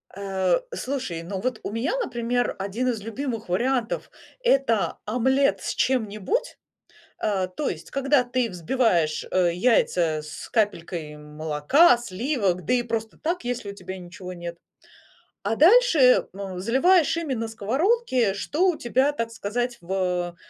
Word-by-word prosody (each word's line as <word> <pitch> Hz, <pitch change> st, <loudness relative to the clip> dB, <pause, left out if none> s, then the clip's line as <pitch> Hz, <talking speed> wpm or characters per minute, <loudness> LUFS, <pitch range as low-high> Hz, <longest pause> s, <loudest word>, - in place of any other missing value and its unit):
Э, 195 Hz, -, 0 dB, 0.2 s
слушай, 255 Hz, -, -3 dB
ну 190 Hz, +2 st, -5 dB
вот 255 Hz, -1 st, -2 dB
у -, -, -4 dB
меня, 250 Hz, -, -1 dB
например, 245 Hz, -, -1 dB
1 200 Hz, +6 st, -2 dB
из 225 Hz, -4 st, -2 dB
любимых 225 Hz, -1 st, -5 dB
вариантов- 240 Hz, +4 st, 0 dB, 0.3 s
это 270 Hz, -, +2 dB
омлет 265 Hz, +5 st, +2 dB
с -, -, -3 dB
чем-нибудь. 240 Hz, -, -1 dB, 0.6 s
Э, 195 Hz, -3 st, 0 dB
то 185 Hz, +11 st, -3 dB
есть -, -, -7 dB
когда 275 Hz, -1 st, +2 dB
ты 245 Hz, -1 st, -1 dB
взбиваешь, 175 Hz, -4 st, +1 dB
э, 175 Hz, -2 st, +2 dB
яйца 175 Hz, -6 st, +2 dB
с 150 Hz, 0 st, -9 dB
капелькой 170 Hz, -8 st, -1 dB
молока, 150 Hz, -, +3 dB
сливок, 210 Hz, -, -1 dB
да -, -, +1 dB
и 245 Hz, -1 st, +2 dB
просто 225 Hz, -1 st, -4 dB
так, 345 Hz, +3 st, -2 dB
если 245 Hz, -4 st, -3 dB
у -, -, -12 dB
тебя 190 Hz, -2 st, -7 dB
ничего 180 Hz, +1 st, -9 dB
нет, 170 Hz, -1 st, -7 dB, 0.9 s
а 205 Hz, +3 st, 0 dB
дальше, 370 Hz, -, +6 dB
э, 250 Hz, -1 st, +6 dB, 0.4 s
заливаешь 320 Hz, -, +3 dB
ими 320 Hz, -5 st, -2 dB
на 230 Hz, -2 st, -2 dB
сковородке, 255 Hz, -, +1 dB
что 300 Hz, -, 0 dB
у 350 Hz, -4 st, +1 dB
тебя, 260 Hz, +4 st, +1 dB
так 230 Hz, -6 st, -3 dB
сказать, 240 Hz, +3 st, -3 dB
в 180 Hz, -1 st, -2 dB
230 Hz, 145 wpm, -25 LUFS, 185-265 Hz, 0.9 s, дальше